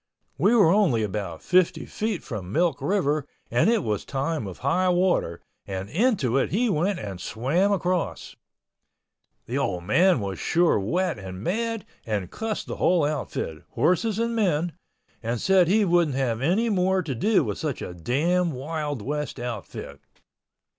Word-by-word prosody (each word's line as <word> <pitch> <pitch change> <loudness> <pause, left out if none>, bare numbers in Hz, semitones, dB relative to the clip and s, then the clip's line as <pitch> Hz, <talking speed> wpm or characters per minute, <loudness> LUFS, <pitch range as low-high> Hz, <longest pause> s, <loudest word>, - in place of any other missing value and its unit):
We 205 - +4
were 200 -8 +6
only 175 - +3
about 95 -5 -4
fifty 180 -1 +2
feet 215 -4 -3
from 100 -8 -6
Milk 165 +2 +1
River 155 -7 0 0.2
and 120 - +3
it 235 - +2
was 105 -3 -1
time 140 -3 -2
of 95 - -8
high 180 +8 +1
water, 180 - +1 0.3
and 95 +1 -5
into 175 - +2
it - - 0
he 230 +3 +1
went 180 +4 +1
and 95 - -6
swam 150 - +1
across. 180 - -1 1.1
The 130 +4 -2
old 90 -10 -1
man 170 - +4
was 100 -3 -4
sure 170 -7 +2
wet 175 - -1
and 95 0 -8
mad, 225 - -1 0.2
and 100 -5 -3
cussed 220 -1 -3
the - - -6
whole 175 -4 +3
outfit—horses 155 - -1
and 230 0 0
men—and 165 - -3
said 190 - +4
he 205 +3 +3
wouldn't 170 -6 +2
have 120 -4 0
any 195 - +2
more 190 -2 +2
to 150 -5 -3
do 205 - +2
with - - -4
such 150 -5 -3
a 90 - -6
damn 160 - 0
wild 145 -2 -4
west 150 +1 -3
outfit. 110 -11 -6
155 Hz, 155 wpm, -25 LUFS, 115-185 Hz, 1.1 s, were